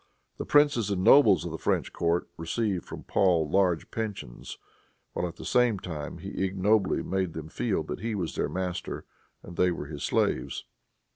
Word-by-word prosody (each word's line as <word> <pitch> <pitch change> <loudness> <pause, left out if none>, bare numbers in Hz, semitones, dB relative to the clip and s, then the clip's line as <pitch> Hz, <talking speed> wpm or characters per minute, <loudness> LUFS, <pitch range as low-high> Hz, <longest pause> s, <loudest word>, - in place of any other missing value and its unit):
The - - -5
princes 145 -8 +4
and 95 -2 -1
nobles 135 -7 +6
of 85 - -4
the 80 - -5
French - - 0
court 85 +1 0
received 95 +2 -2
from - - -8
Paul 85 -5 +2
large 90 0 +1
pensions, 105 - -5 0.6
while, 90 - -1
at 85 - -8
the - - -10
same 125 -4 +3
time, 80 -6 -6
he - - -4
ignobly 95 +1 +2
made 95 -3 -1
them 80 -1 -7
feel 95 -3 -1
that 80 - -5
he 110 +2 -2
was 90 -5 -3
their - - -1
master 90 -1 -4 0.4
and 85 - -10
they 90 - +4
were 85 -4 -4
his 75 -1 -8
slaves. - - 0
95 Hz, 175 wpm, -28 LUFS, 85-105 Hz, 0.6 s, nobles